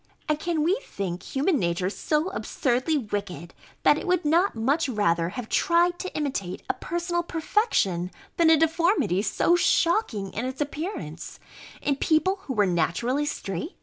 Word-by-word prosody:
And 305 0 0
can 330 -2 0
we 375 +9 +1
think 180 -3 -4
human 285 - 0
nature 175 +2 0
so 305 - 0
absurdly 275 -4 0
wicked, 200 - -4 0.3
that - - +5
it - - -7
would 360 -2 +1
not 335 +4 +3
much 275 +7 +1
rather 170 -7 +1
have 225 +4 -6
tried 345 +5 +2
to 370 - -4
imitate 265 -12 -3
a - - +1
personal 345 0 -2
perfection, 320 - 0 0.3
than 335 -1 +5
a 320 - +7
deformity 320 - +2
so 220 - +2
shocking 335 - +1
in 225 - -3
its 260 +1 -5
appearance, 295 - -5 0.4
in 280 -2 +1
people 335 +7 +2
who 265 - -2
were 210 -4 +3
naturally 195 - 0
straight? 195 - -4
290 Hz, 155 wpm, -26 LUFS, -, 0.4 s, a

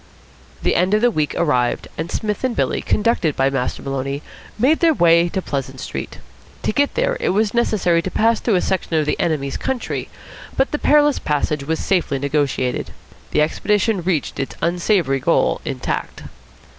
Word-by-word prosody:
The - - +2
end 185 +4 +2
of 215 - +1
the 245 0 +4
week 155 -7 -1
arrived, 125 -7 +1
and 160 +2 -4
Psmith 210 +1 -2
and 255 -2 0
Billy, - - 0
conducted 210 -9 +1
by 135 +1 +2
Master 130 -2 -2
Maloney, 135 +1 -3 0.3
made 270 +8 +3
their 330 -2 +4
way 170 -2 +4
to 190 +1 -3
Pleasant 135 -2 -4
Street. - - -6 0.5
To - - +1
get 285 +5 +1
there - - +1
it - - 0
was 210 +2 +1
necessary 195 -8 +2
to 185 - -4
pass 225 +4 +2
through 225 - +1
a 180 - +2
section 185 -3 -1
of 155 -1 +2
the 150 - -1
enemy's 150 -6 -1
country; 265 -2 -3 0.5
but 270 - +2
the 295 - -2
perilous 295 -1 +4
passage 150 -1 -1
was 160 +2 -1
safely 170 -7 0
negotiated. 140 -2 -1 0.4
The - - +2
expedition 205 +5 +1
reached 170 -5 -1
its 135 - -3
unsavoury 170 -5 +1
goal 130 - +1
intact. - - -4
175 Hz, 175 wpm, -20 LUFS, 145-220 Hz, 0.5 s, the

